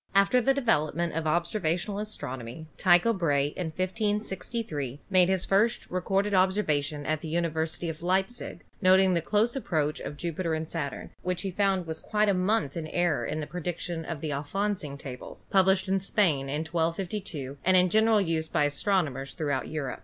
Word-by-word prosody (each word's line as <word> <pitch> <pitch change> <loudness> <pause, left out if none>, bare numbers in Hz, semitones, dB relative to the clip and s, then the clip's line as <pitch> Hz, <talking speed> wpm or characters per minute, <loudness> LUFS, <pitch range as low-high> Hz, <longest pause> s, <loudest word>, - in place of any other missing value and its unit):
After 200 +6 +5
the 270 - +3
development 170 - +1
of 160 0 -2
observational 175 +3 0
astronomy 140 - -5
Tycho 180 +5 +4
Brahe 145 -7 +1
in 180 - -3
1563 190 - -2
made 185 -1 +5
his 190 -1 +1
first 210 +4 +1
recorded 195 +3 0
observation 155 -7 +1
at 155 +1 -1
the - - -6
University 160 0 -1
of 160 0 -5
Leipzig, 190 +6 -1 0.2
noting 190 0 +5
the 170 - +1
close 215 - +1
approach 155 - -1
of - - -5
SATURN - - -15
203 170 - -2
Jupiter 165 0 -2
and 160 0 -4
Saturn, 145 -4 -4
which 180 +1 -2
he 195 - -2
found 195 -1 +1
was 160 -1 -5
quite 210 +2 +1
a - - +4
month 185 -4 +1
in 165 -2 -4
error 175 -1 +1
in 155 - -2
the - - -3
prediction 175 0 -4
of 160 -2 -5
the 155 - -3
Alfonsine 150 +1 -2
Tables, 130 -3 -9
published 190 0 +4
in 195 +1 +2
Spain 170 -8 +1
in 150 +3 -1
1252 165 -3 -3
and 185 0 +5
in 180 0 +5
general 220 +1 +4
use 165 -4 0
by 150 - +1
astronomers' 145 -3 0
throughout 145 -4 -1
Europe. 145 -5 -4
175 Hz, 175 wpm, -28 LUFS, 155-195 Hz, 0.2 s, After